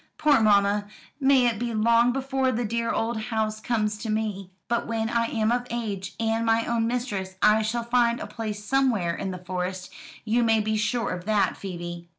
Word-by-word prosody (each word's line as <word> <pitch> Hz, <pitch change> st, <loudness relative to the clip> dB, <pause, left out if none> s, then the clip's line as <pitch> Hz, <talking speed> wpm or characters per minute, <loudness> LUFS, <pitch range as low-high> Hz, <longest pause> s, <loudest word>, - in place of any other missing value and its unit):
Poor 295 Hz, -4 st, +4 dB
mamma! 205 Hz, -1 st, +3 dB, 0.3 s
may 270 Hz, -2 st, +4 dB
it 230 Hz, -3 st, +1 dB
be 235 Hz, -1 st, -2 dB
long 230 Hz, +2 st, +4 dB
before 265 Hz, 0 st, 0 dB
the 240 Hz, 0 st, -1 dB
dear 230 Hz, +2 st, -1 dB
old 225 Hz, 0 st, -1 dB
house 220 Hz, -2 st, -1 dB
comes 215 Hz, -3 st, -1 dB
to 225 Hz, 0 st, -5 dB
me. 210 Hz, -3 st, -2 dB, 0.2 s
But 235 Hz, +1 st, -1 dB
when 225 Hz, 0 st, -1 dB
I 235 Hz, -1 st, +2 dB
am 220 Hz, -1 st, 0 dB
of 245 Hz, 0 st, -1 dB
age, 205 Hz, -5 st, -4 dB
and 225 Hz, 0 st, 0 dB
my 225 Hz, 0 st, +2 dB
own 230 Hz, -1 st, 0 dB
mistress 210 Hz, -6 st, -3 dB
I 215 Hz, +2 st, +5 dB
shall 230 Hz, +2 st, -1 dB
find 235 Hz, 0 st, +2 dB
a -, -, -5 dB
place 210 Hz, -2 st, -6 dB
somewhere 235 Hz, -10 st, +1 dB
in 195 Hz, -, -4 dB
the 185 Hz, -, -5 dB
Forest, 180 Hz, +1 st, -5 dB, 0.3 s
you 230 Hz, +2 st, +2 dB
may 225 Hz, -1 st, +3 dB
be 215 Hz, 0 st, 0 dB
sure 215 Hz, +3 st, 0 dB
of 180 Hz, 0 st, -5 dB
that, 210 Hz, -1 st, +2 dB
Phoebe." 175 Hz, -2 st, -7 dB
225 Hz, 195 wpm, -25 LUFS, 205-235 Hz, 0.3 s, I